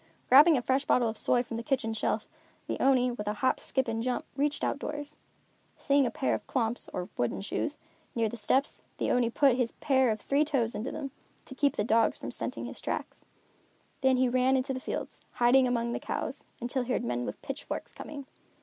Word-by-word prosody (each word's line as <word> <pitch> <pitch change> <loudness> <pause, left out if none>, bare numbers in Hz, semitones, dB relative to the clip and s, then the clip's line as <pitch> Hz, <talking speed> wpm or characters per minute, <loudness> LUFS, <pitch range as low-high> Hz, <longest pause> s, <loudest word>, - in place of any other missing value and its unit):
Grabbing 295 +4 +8
a 245 - -2
fresh 265 +2 +1
bottle 245 -4 +3
of 220 - -2
soy 245 +2 +2
from 230 -2 -6
the 230 - -4
kitchen 260 -4 0
shelf, 220 - -1 0.4
the - - -3
Oni, 255 -2 +4
with 210 -3 -6
a 210 - +1
hop, 260 +4 +1
skip 265 -1 -1
and 225 0 -1
jump, 250 +1 -1
reached 290 +1 0
outdoors. 290 0 -3 0.6
Seeing 280 -2 +3
a - - 0
pair 265 - 0
of - - -4
klomps, 235 -2 -1
or 180 0 -4
wooden 120 - 0
shoes, 295 +9 -2 0.4
near 230 -1 +2
the 215 - -5
steps, 265 +5 0 0.2
the - - 0
Oni 245 -2 +3
put 260 +1 +3
his 245 -2 0
pair 265 -4 +2
of 215 -1 0
three 280 +6 +2
toes 270 -7 0
into 230 +6 -3
them, 280 -3 -5 0.3
to - - -10
keep 280 +1 +1
the - - 0
dogs 225 +1 +3
from - - -6
scenting - - -4
its - - -7
tracks. - - -4 0.8
Then 265 -1 +4
he 255 0 +3
ran 255 +2 +3
into 260 +1 -1
the 260 - -3
fields, - - -5
hiding 250 +2 +5
among 235 -1 0
the - - -2
cows, - - -4
until 245 +2 -1
he 250 +1 -3
heard - - 0
men 120 +1 -1
with - - -5
pitchforks 280 +1 -5
coming. 285 -2 -8
255 Hz, 215 wpm, -29 LUFS, 230-275 Hz, 0.8 s, Grabbing